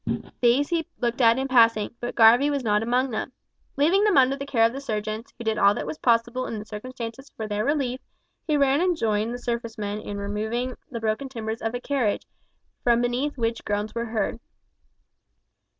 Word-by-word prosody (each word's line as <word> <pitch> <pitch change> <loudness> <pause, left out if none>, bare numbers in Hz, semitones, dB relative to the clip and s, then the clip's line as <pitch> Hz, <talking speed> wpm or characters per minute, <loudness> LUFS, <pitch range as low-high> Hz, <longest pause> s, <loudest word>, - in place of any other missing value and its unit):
These 255 +4 +3
he 330 -2 -1
looked 240 +1 -1
at 230 0 +5
in 265 +1 -1
passing, 230 -4 +4
but 240 - -4
Garvie 240 +5 +6
was 280 -2 -1
not 210 -2 +2
among 250 +3 +1
them. 245 +4 -4 0.4
Leaving 340 +8 +4
them 420 -7 +3
under 265 0 +5
the 275 0 -7
care 230 -5 +3
of 230 - +1
the 275 - -5
surgeons, 215 0 -4
who 235 - -7
did 220 -1 0
all 200 +1 +5
that - - -4
was 310 - -6
possible 240 +1 +1
in 225 - -4
the 210 - -7
circumstances 235 +4 -7
for 220 - -4
their 210 0 -1
relief, 265 -2 0 0.5
he 305 -2 +2
ran 280 +1 +3
and 360 -2 +1
joined 215 -1 0
the 245 - -4
surface 235 -1 -4
men 205 0 -3
in 205 -1 -6
removing 220 +5 -3
the 235 - -5
broken 225 +4 -2
timbers 225 -3 -5
of 225 +2 -2
a - - -2
carriage, 250 -6 -1 0.6
from 235 -1 +4
beneath 250 +4 -1
which 230 -1 -1
groans 210 +1 -2
were 235 0 -2
heard. 220 -1 -2
235 Hz, 200 wpm, -25 LUFS, 220-265 Hz, 0.6 s, Garvie